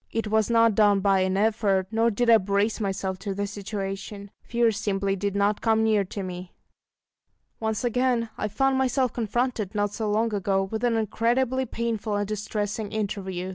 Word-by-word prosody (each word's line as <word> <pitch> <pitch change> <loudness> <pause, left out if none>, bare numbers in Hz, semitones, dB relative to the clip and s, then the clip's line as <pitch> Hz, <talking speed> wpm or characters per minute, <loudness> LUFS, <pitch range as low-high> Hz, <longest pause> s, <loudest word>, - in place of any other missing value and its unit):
It 225 -1 -2
was 220 0 +2
not 230 -1 +4
done 205 -1 +4
by 195 -1 +3
an 185 0 +1
effort, 205 -3 +2
nor 225 +1 +2
did 235 +2 0
I 230 -1 +7
brace 200 +3 0
myself 190 -2 -2
to 195 -1 -4
the 205 +1 -1
situation: 200 0 -6
fear 235 -1 +1
simply 195 -2 -1
did 200 0 -2
not 205 +1 +1
come 220 -1 +2
near 215 -2 +3
to 195 +2 -6
me. 180 -1 -7 1.1
Once 220 0 -2
again 245 -1 +1
I 215 - -2
found 265 +5 +1
myself 260 -1 +1
confronted, 235 -2 -2
not 205 0 0
so 220 -2 -2
long 220 +2 +1
ago, 195 -1 +1
with 220 +4 -4
an 235 -2 +2
incredibly 240 +4 0
painful 225 -2 -2
and 205 0 -1
distressing 210 0 -3
interview. 190 -3 -3
210 Hz, 175 wpm, -25 LUFS, 200-230 Hz, 1.1 s, I